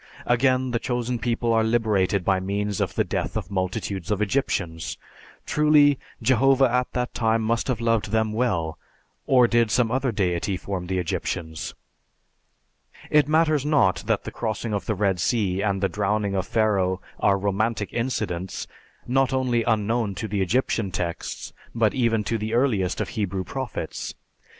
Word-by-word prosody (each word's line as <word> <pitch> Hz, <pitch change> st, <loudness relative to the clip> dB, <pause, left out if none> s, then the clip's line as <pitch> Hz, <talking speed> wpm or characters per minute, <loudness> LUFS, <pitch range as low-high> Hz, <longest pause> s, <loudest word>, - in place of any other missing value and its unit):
Again 130 Hz, +1 st, +2 dB
the 120 Hz, -, 0 dB
Chosen 120 Hz, 0 st, -2 dB
People 115 Hz, +1 st, 0 dB
are 110 Hz, 0 st, +3 dB
liberated 105 Hz, -5 st, +1 dB
by 95 Hz, -1 st, +3 dB
means 100 Hz, +1 st, -2 dB
of -, -, -1 dB
the -, -, +2 dB
death -, -, -2 dB
of 90 Hz, -, -5 dB
multitudes 95 Hz, -1 st, -3 dB
of 105 Hz, -2 st, 0 dB
Egyptians. 100 Hz, -, -1 dB, 0.5 s
Truly, 150 Hz, -2 st, +4 dB, 0.2 s
Jehovah 130 Hz, +2 st, +4 dB
at 125 Hz, 0 st, +1 dB
that 125 Hz, 0 st, -2 dB
time 115 Hz, -1 st, +1 dB
must 115 Hz, +1 st, 0 dB
have 125 Hz, -4 st, -1 dB
loved 115 Hz, -3 st, +1 dB
them 110 Hz, 0 st, +1 dB
well, 90 Hz, -9 st, -1 dB, 0.5 s
or 125 Hz, -2 st, +5 dB
did 115 Hz, -1 st, +3 dB
some 115 Hz, 0 st, +2 dB
other 130 Hz, 0 st, +1 dB
Deity 95 Hz, -2 st, 0 dB
form 90 Hz, -1 st, -5 dB
the 95 Hz, 0 st, -1 dB
Egyptians? 80 Hz, -2 st, -3 dB, 1.4 s
It 150 Hz, -2 st, +5 dB
matters 155 Hz, -2 st, +3 dB
not 145 Hz, -11 st, +3 dB
that -, -, +1 dB
the -, -, -6 dB
crossing 110 Hz, 0 st, -3 dB
of 100 Hz, -3 st, -3 dB
the 110 Hz, -, 0 dB
Red 95 Hz, -2 st, +1 dB
Sea 100 Hz, -3 st, +1 dB
and 100 Hz, -2 st, 0 dB
the -, -, +4 dB
drowning 105 Hz, 0 st, -1 dB
of 95 Hz, -1 st, -1 dB
Pharaoh 95 Hz, -4 st, +1 dB, 0.2 s
are 100 Hz, -1 st, +3 dB
romantic 105 Hz, +2 st, -1 dB
incidents, 105 Hz, -7 st, -2 dB, 0.4 s
not 135 Hz, +2 st, +2 dB
only 125 Hz, -3 st, +1 dB
unknown 110 Hz, -1 st, 0 dB
to 110 Hz, -, -4 dB
the 100 Hz, -1 st, -1 dB
Egyptian 110 Hz, 0 st, 0 dB
texts, 85 Hz, 0 st, -4 dB, 0.2 s
but 110 Hz, -3 st, +2 dB
even 115 Hz, -4 st, +1 dB
to 115 Hz, +1 st, -1 dB
the 110 Hz, +2 st, -2 dB
earliest 110 Hz, -8 st, +1 dB
of -, -, -3 dB
Hebrew 100 Hz, -4 st, -2 dB
prophets. 130 Hz, +1 st, -5 dB
110 Hz, 160 wpm, -24 LUFS, 95-120 Hz, 1.4 s, or